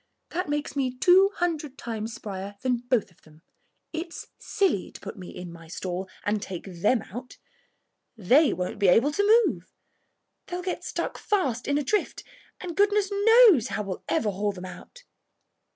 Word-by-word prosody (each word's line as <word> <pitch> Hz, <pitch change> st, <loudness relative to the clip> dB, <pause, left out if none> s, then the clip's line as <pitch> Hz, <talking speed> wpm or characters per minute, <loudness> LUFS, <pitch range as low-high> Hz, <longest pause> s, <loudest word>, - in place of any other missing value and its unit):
That 350 Hz, -2 st, -2 dB
makes 295 Hz, -1 st, -2 dB
me 260 Hz, -2 st, -1 dB
two 375 Hz, +6 st, +6 dB
hundred 315 Hz, -6 st, -2 dB
times 225 Hz, -1 st, -5 dB
sprier 200 Hz, 0 st, -7 dB
than 255 Hz, -1 st, +1 dB
both 240 Hz, -7 st, +1 dB
of 175 Hz, -, -27 dB
them. 155 Hz, +1 st, -20 dB, 0.5 s
It's 335 Hz, +1 st, -6 dB
silly 390 Hz, -, 0 dB
to -, -, -11 dB
put 200 Hz, -, -8 dB
me 185 Hz, -3 st, -9 dB
in 180 Hz, -1 st, -8 dB
my 165 Hz, -1 st, -13 dB
stall 185 Hz, +2 st, -5 dB, 0.2 s
and 210 Hz, 0 st, 0 dB
take 185 Hz, -3 st, -6 dB, 0.2 s
them 220 Hz, +2 st, +3 dB
out. 250 Hz, +2 st, -8 dB, 0.8 s
They 260 Hz, -, +4 dB
won't 185 Hz, +4 st, -3 dB
be 200 Hz, -, +3 dB
able 235 Hz, +11 st, +5 dB
to 425 Hz, +7 st, +5 dB
move. -, -, -4 dB, 0.8 s
They'll 360 Hz, 0 st, -4 dB
get 370 Hz, -, -3 dB
stuck -, -, -4 dB
fast 270 Hz, -, -1 dB
in 285 Hz, +1 st, +2 dB
a 295 Hz, -, 0 dB
drift, 420 Hz, +9 st, -1 dB, 0.4 s
and 350 Hz, -3 st, -6 dB
goodness 410 Hz, 0 st, +2 dB
knows 405 Hz, -, +6 dB
how 210 Hz, -, -3 dB
we'll 190 Hz, -2 st, -6 dB
ever 215 Hz, -2 st, +1 dB
haul 205 Hz, +2 st, -1 dB
them 185 Hz, -2 st, -9 dB
out." 185 Hz, -, -11 dB
250 Hz, 170 wpm, -26 LUFS, -, 0.8 s, two